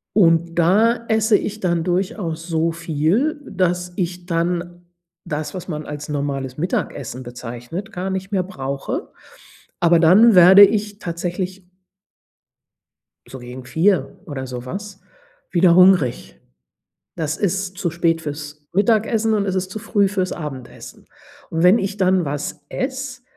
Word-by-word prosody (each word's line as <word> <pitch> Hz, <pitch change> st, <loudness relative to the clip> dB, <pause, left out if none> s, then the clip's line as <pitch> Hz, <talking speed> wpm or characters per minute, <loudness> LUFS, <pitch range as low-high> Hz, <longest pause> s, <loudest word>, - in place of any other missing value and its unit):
Und 170 Hz, -3 st, +3 dB
da 225 Hz, +7 st, +3 dB
esse 220 Hz, -1 st, +3 dB
ich 215 Hz, +1 st, -5 dB
dann 170 Hz, -3 st, 0 dB
durchaus 175 Hz, -2 st, -2 dB
so 165 Hz, 0 st, 0 dB
viel, 170 Hz, -, 0 dB
dass 180 Hz, -1 st, -1 dB
ich 180 Hz, -1 st, -3 dB
dann 175 Hz, 0 st, -2 dB, 0.4 s
das, 155 Hz, +4 st, -4 dB
was 185 Hz, 0 st, -7 dB
man 150 Hz, -2 st, -5 dB
als 145 Hz, 0 st, -7 dB
normales 140 Hz, -2 st, -3 dB
Mittagessen 140 Hz, -6 st, -3 dB
bezeichnet, 125 Hz, -, -7 dB
gar 185 Hz, +2 st, -4 dB
nicht 190 Hz, +1 st, -4 dB
mehr 190 Hz, -2 st, +1 dB
brauche. 140 Hz, -7 st, -5 dB, 0.7 s
Aber 170 Hz, -1 st, +5 dB
dann 195 Hz, +7 st, +6 dB
werde 185 Hz, +3 st, +9 dB
ich 210 Hz, 0 st, 0 dB
tatsächlich 180 Hz, +2 st, -4 dB, 1.6 s
so 130 Hz, -, -9 dB
gegen 125 Hz, +1 st, -9 dB
4 160 Hz, +1 st, +1 dB
oder 130 Hz, -3 st, -5 dB
sowas, 190 Hz, +12 st, -7 dB, 0.5 s
wieder 175 Hz, -1 st, +4 dB
hungrig. 165 Hz, -, +3 dB, 0.8 s
Das 155 Hz, -1 st, -2 dB
ist 195 Hz, -1 st, -2 dB
zu 175 Hz, -4 st, -1 dB
spät 165 Hz, -1 st, 0 dB
fürs 150 Hz, -1 st, -7 dB
Mittagessen 220 Hz, +1 st, +2 dB
und 205 Hz, -2 st, +1 dB
es 190 Hz, -, -1 dB
ist 185 Hz, 0 st, -2 dB
zu 215 Hz, -, -5 dB
früh 205 Hz, -2 st, +1 dB
fürs 190 Hz, -2 st, -2 dB
Abendessen. 135 Hz, -7 st, -9 dB, 0.4 s
Und 165 Hz, 0 st, -2 dB
wenn 185 Hz, +6 st, +6 dB
ich 195 Hz, 0 st, -3 dB
dann 185 Hz, -2 st, +2 dB
was 145 Hz, +1 st, -4 dB
esse, 260 Hz, -1 st, -4 dB
175 Hz, 135 wpm, -20 LUFS, 155-195 Hz, 1.6 s, werde